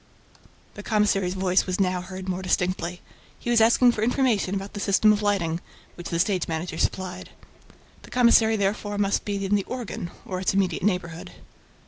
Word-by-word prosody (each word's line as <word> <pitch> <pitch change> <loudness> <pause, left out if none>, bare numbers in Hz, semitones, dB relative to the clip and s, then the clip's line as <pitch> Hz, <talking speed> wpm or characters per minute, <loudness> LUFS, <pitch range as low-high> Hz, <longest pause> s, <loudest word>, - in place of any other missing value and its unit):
The 205 - -9
commissary's 205 -4 +1
voice 190 0 +1
was 185 +1 -2
now 185 -2 +1
heard 185 +1 -8
more 185 0 -2
distinctly. 180 -1 -1 0.4
He 240 - -3
was 235 -2 +4
asking 235 +2 +5
for 215 - -4
information 225 -5 +1
about 195 +1 -5
the 205 - -6
system 200 +2 +4
of 210 - -2
lighting, 180 -6 0 0.3
which 175 - -8
the 170 - -1
stage 185 0 +1
manager 160 0 -4
supplied. 185 0 -2 0.7
The - - -15
commissary 235 -2 +4
therefore 205 0 -1
must 200 0 0
be 200 -1 -2
in 195 - -1
the 200 -1 +2
"organ" 240 -8 -5 0.2
or 185 -1 -4
its 190 +1 0
immediate 185 -4 +1
neighborhood. 180 -4 -2
195 Hz, 175 wpm, -25 LUFS, 180-210 Hz, 0.7 s, asking